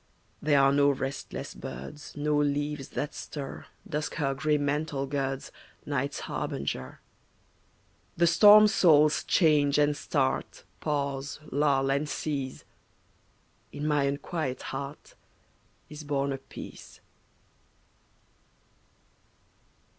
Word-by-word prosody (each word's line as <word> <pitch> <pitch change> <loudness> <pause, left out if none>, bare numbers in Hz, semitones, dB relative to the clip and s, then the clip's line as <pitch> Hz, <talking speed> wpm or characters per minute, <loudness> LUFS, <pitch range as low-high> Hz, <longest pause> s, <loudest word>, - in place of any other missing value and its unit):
There 145 -1 +4
are 135 0 +5
no 140 0 +4
restless 135 0 -4
birds, 70 - -8
No 150 +1 +1
leaves 145 -1 -1
that 145 - -3
stir, 140 -3 -7 0.2
Dusk 150 -1 -3
her 135 -3 0
gray 150 +2 +1
mantle 145 -1 -1
girds, 135 -1 -3 0.3
Night's 140 0 -2
harbinger. 65 -1 -4 1.2
The 170 - +4
storm 210 +5 +8
soul's 155 -7 +4
change 150 -4 +3
and 150 0 +3
start 135 -1 -1 0.2
Pause, 140 -1 -2
lull, 135 -1 +2
and 145 +2 0
cease; 140 -4 -3 1.1
In 145 - -5
my 150 -2 +2
unquiet 140 0 -3
heart 140 +2 -7 0.7
Is 150 0 -9
born 140 -1 -1
a 135 - -5
peace. - - -11
145 Hz, 100 wpm, -28 LUFS, 135-150 Hz, 1.2 s, storm